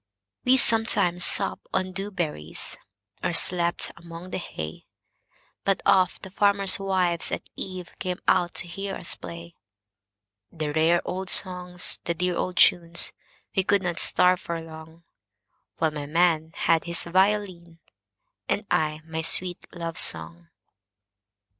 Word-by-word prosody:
We 255 +1 +5
sometimes 220 -8 +3
supped - - 0
on 185 0 0
dew 195 +2 -5
berries, 155 - -4 0.5
Or 175 - 0
slept 170 +1 +1
among 170 +2 -10
the - - -3
hay, 80 - -7 0.8
But 195 -1 +1
oft 185 -2 +3
the 190 - -9
farmers' 200 -1 +3
wives 185 -3 0
at - - -4
eveCame 185 -1 -6
out 175 -1 +2
to 180 - -1
hear 195 +3 -5
us 170 - -1
play; 85 -1 -9 1.0
The 155 -2 -4
rare 165 +2 +3
old 190 0 -4
songs, 180 -1 +1
the 170 - -1
dear 180 +1 -1
old 185 +1 -3
tunes,—We 170 +2 +2
could 200 +1 +2
not 175 -1 -2
starve 180 0 +4
for 170 -1 -4
longWhile 160 +1 -12 0.9
my 145 -1 -6
man 165 0 +2
had 165 -1 +2
his 170 0 0
violin, 185 -2 0 0.7
And 210 - 0
I 155 0 0
my 160 0 -4
sweet 175 +2 +1
love 165 -2 -5
song. 80 +1 +2
175 Hz, 130 wpm, -25 LUFS, 165-185 Hz, 1.0 s, We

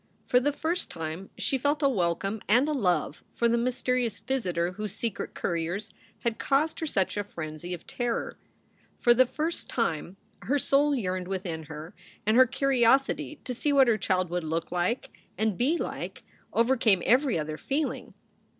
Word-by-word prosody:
For 250 - +4
the 285 +3 +1
first 325 +5 -2
time 165 +4 -5
she 270 -2 +1
felt 290 +3 +1
a - - +6
welcome 195 -2 0
and 245 +7 +5
a - - 0
love 180 - 0
for 235 - +3
the 235 - +3
mysterious 245 -2 0
visitor 180 -10 -1
whose 210 +2 -5
secret 230 -3 -4
couriers 175 +5 -2 0.3
had 235 -2 -1
caused 290 +3 +1
her 320 - -2
such 195 -7 0
a 205 - 0
frenzy 160 -2 -7
of 175 -2 -5
terror. 240 -2 -3 0.6
For 240 - +6
the 255 +1 +5
first 315 +6 -3
time 180 -5 -1 0.2
her 285 +4 +1
soul 285 +2 +3
yearned 185 -6 -2
within 180 -4 -4
her, 155 +2 -8 0.3
and 215 +2 +3
her 255 +1 +7
curiosity 270 +3 +2
to 255 - -3
see 290 +5 0
what 275 -2 +6
her 220 -2 +3
child 185 -2 0
would 175 -1 -1
look 160 +1 -2
like 180 +8 -1 0.2
and 220 -2 +1
be 275 - +2
like - - -5 0.3
overcame 230 -6 +3
every 255 - +4
other 155 0 -4
feeling. 290 +2 -2
225 Hz, 170 wpm, -28 LUFS, 180-265 Hz, 0.6 s, her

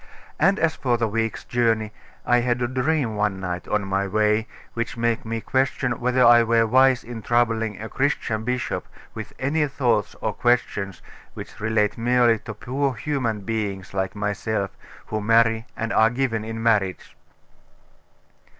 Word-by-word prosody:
And 195 +6 +4
as 165 -1 +1
for 120 -3 0
the 115 -1 0
week's 115 +1 -2
journey, 115 -3 0 0.3
I 120 0 +4
had 120 0 0
a 120 - 0
dream 130 -2 0
one 105 -2 0
night, 90 -1 -4
on 105 -2 0
my 100 0 -1
way, 105 +2 +1 0.3
which 115 +1 -3
made 115 -1 0
me 115 0 -3
question 130 -1 0
whether 125 +1 +3
I 120 0 +8
were 115 0 +3
wise 130 +2 +4
in 115 -1 -7
troubling 115 -3 0
a 110 - -5
Christian 115 -5 -1
bishop 125 0 -2 0.3
with 110 - -7
any 150 +3 0
thoughts 120 -7 0
or - - -2
questions 105 -6 0 0.3
which - - -9
relate 105 0 0
merely 120 -1 +3
to 105 - -8
poor 135 +4 -2
human 115 -4 -2
beings 100 -3 -4
like 95 +1 -2
myself, 105 0 -2 0.3
who 110 0 -3
marry 115 +1 +3
and 115 0 -2
are 110 0 +5
given 120 -3 -1
in 115 0 -5
marriage. 105 -5 0
115 Hz, 160 wpm, -23 LUFS, 105-125 Hz, 0.3 s, I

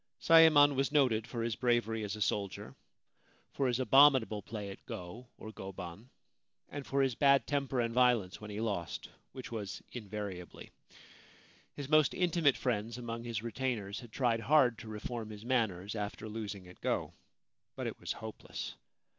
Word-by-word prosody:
Sayemon 155 -3 +7
was 135 +1 0
noted 125 -7 +3
for 115 -2 -3
his 115 -2 -1
bravery 120 -2 +1
as 105 0 -3
a 105 - 0
soldier, 100 0 -3 0.8
for 135 - 0
his 125 0 0
abominable 130 -5 +5
play 105 -1 -6
at - - -12
go 110 +3 -7
(or 110 - -8
goban), 95 +2 -8 0.6
and 145 -1 -7
for 135 0 +2
his 130 -2 +1
bad 140 +2 +4
temper 140 -3 -1
and 115 -1 0
violence 120 -7 +2
when 105 - -8
he 105 0 -5
lost, 100 -7 -3 0.2
which 130 -2 -8
was 105 -4 -5
invariably. 105 -5 -7 1.0
His 140 -2 -5
most 155 0 +4
intimate 170 -6 +3
friends 115 -1 -2
among 115 -1 -5
his 115 -2 -3
retainers 115 -3 -3
had 120 -3 -12
tried 120 -2 +1
hard 125 -2 +4
to - - -9
reform 110 +1 -5
his 105 +1 -9
manners 105 -6 0
after 105 +1 -4
losing 105 -4 -6
at 90 - -15
go; - - -1 0.6
but - - -4
it - - -4
was - - -3
hopeless. 110 -1 -7
115 Hz, 165 wpm, -33 LUFS, 105-130 Hz, 1.0 s, Sayemon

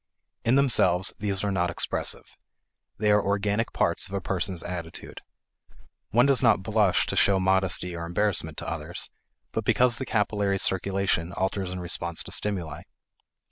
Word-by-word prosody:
In 120 - +3
themselves, 95 -10 +3
these 100 -2 -1
are 100 - 0
not 90 -2 +1
expressive. 85 - -3 0.6
They 105 0 +2
are 105 0 +4
organic 105 +3 0
parts - - 0
of 100 - -6
a - - 0
person's 95 -2 -2
attitude. 85 -2 -7 0.9
One 120 +4 +4
does 140 -3 +4
not 115 -6 +4
blush 105 -4 +2
to - - -3
show 100 -1 +4
modesty 95 -1 +1
or 85 0 -5
embarrassment 85 -4 0
to - - -6
others, - - -5 0.4
but - - -2
because 125 -2 +3
the 130 - -3
capillary 105 -2 +1
circulation 95 -3 0
alters 95 0 -2
in 90 0 -5
response 85 -1 0
to - - -9
stimuli. 85 -7 -2
95 Hz, 155 wpm, -26 LUFS, 90-105 Hz, 0.9 s, are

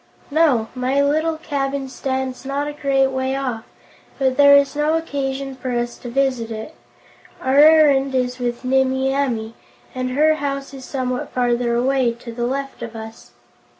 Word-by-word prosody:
"No; 285 -8 +3
my 255 +2 0
little 310 +3 +1
cabin 280 -3 -3
stands 260 -1 -3
not 280 +2 -2
a 295 - -4
great 270 -2 +1
way 260 0 -1
off, 250 -5 -3 0.5
but 265 -2 +1
there 285 0 +7
is 280 0 +1
no 300 +2 +2
occasion 275 -4 -3
for 255 0 -6
us 240 0 -2
to 245 - -7
visit 255 -2 0
it. 220 +7 -7 0.7
Our 265 +2 +2
errand 290 -3 +5
is 250 0 -1
with 245 0 -3
Nimmie 265 +1 +1
Amee, 235 -5 -1 0.4
and 255 0 -3
her 310 +3 +4
house 275 -1 -4
is 265 -1 -9
somewhat 255 -2 -3
farther 240 -1 0
away, 255 0 +1
to 235 0 -10
the 240 +1 -2
left 275 +1 -4
of 230 -1 -7
us." 225 0 -10
265 Hz, 165 wpm, -20 LUFS, 250-280 Hz, 0.7 s, there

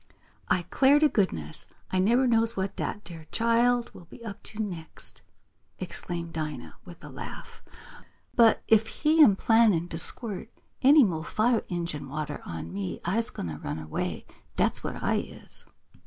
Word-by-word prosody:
"I 180 - +2
'clar 270 - +4
t' 305 +1 +5
goodness 80 - -1 0.2
I 185 - +1
neber 235 +7 +3
knows 230 -2 +2
what 190 +1 -2
dat 185 -4 -5
ar' 160 -1 -11
chile 235 +1 +2
will 175 - -13
be 235 +8 -13
up 205 -3 -7
to 220 - -4
next!" 175 -7 -3 0.6
exclaimed 170 -1 -4
Dinah 150 - -5
with - - -13
a - - -9
laugh. - - -9 0.7
"But 230 -2 +5
if 220 0 +4
he 310 +7 +2
am 205 -9 +6
plannin' 210 -6 +3
to 165 - -3
squirt 220 +1 -1 0.3
any 285 +2 +7
mo' 170 -7 0
fire 220 +7 +1
injun 170 -6 -4
water 150 +1 -4
on 80 0 -6
me 95 -1 -4
I's 225 +6 +1
gwine - - -6
t' - - -4
run - - -3
away, 80 -1 -4 0.3
dat's - - +1
what - - -5
I - - +2
is!" - - -1
195 Hz, 165 wpm, -27 LUFS, 160-230 Hz, 0.7 s, any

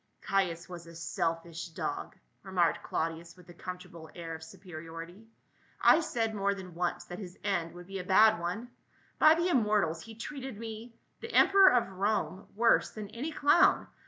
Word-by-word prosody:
" - - -44
Caius 180 -3 0
was 175 -2 -9
a 165 - -12
selfish 165 +1 -3
dog," 165 - -4 0.3
remarked 185 -4 +1
Claudius 165 +2 -4
with 180 - -17
a - - -10
comfortable 170 -2 -9
air 165 -2 -6
of 160 - -7
superiority. 170 +2 -10 0.3
" - - -31
I - - +4
said 230 -8 -1
more 200 -1 0
than 185 -2 -9
once 175 +1 -2
that 175 - -8
his 185 -2 -9
end 175 -5 -1
would 175 0 -10
be 195 +1 -6
a - - -4
bad 215 +2 +5
one. 185 +8 -4 0.5
By 310 +1 +7
the 340 +2 +1
im 265 -8 +4
mortals, 200 -7 +1
he 225 -1 -11
treated 265 0 -6
me 225 +1 -8
— - - -44
the 460 - -6
emperor 390 -3 +7
of 245 -4 +3
Rome 195 0 -1
— - - -28
worse 230 +2 +4
than 210 -2 -8
any 270 +9 -5
clown. 295 +2 +4
190 Hz, 190 wpm, -30 LUFS, 170-225 Hz, 0.5 s, By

